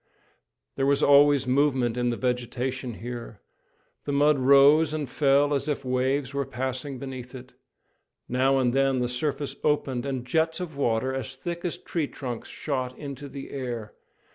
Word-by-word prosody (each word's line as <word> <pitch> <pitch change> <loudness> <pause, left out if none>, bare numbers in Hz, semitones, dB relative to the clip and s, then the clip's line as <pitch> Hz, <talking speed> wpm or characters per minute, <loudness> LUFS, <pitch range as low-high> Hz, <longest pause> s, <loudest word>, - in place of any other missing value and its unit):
There 135 0 +1
was 140 0 +2
always 145 -1 +6
movement 130 -3 +2
in 120 0 0
the 120 - -2
vegetation 125 0 -2
here. 120 -2 -7 0.7
The 145 - -2
mud 145 0 +3
rose 140 +4 +6
and 150 -3 -3
fell 140 +2 +3
as 140 +1 -1
if 140 -2 -2
waves 130 +2 0
were 140 0 0
passing 130 +1 -4
beneath 130 -1 -7
it. 125 0 -11 0.7
Now 130 +2 +2
and 125 -2 +2
then 135 0 +2
the 125 -1 0
surface 140 +3 -3
opened, 140 -4 0
and 130 -3 -3
jets 160 +5 0
of 175 -5 -6
water 130 -1 0
as 135 0 -4
thick 170 +6 -5
as 175 - -2
tree 160 -4 -3
trunks 125 -5 -6
shot 130 -4 -3
into 140 -1 -7
the 135 0 -8
air. 120 -6 -5
135 Hz, 165 wpm, -26 LUFS, 125-145 Hz, 0.7 s, always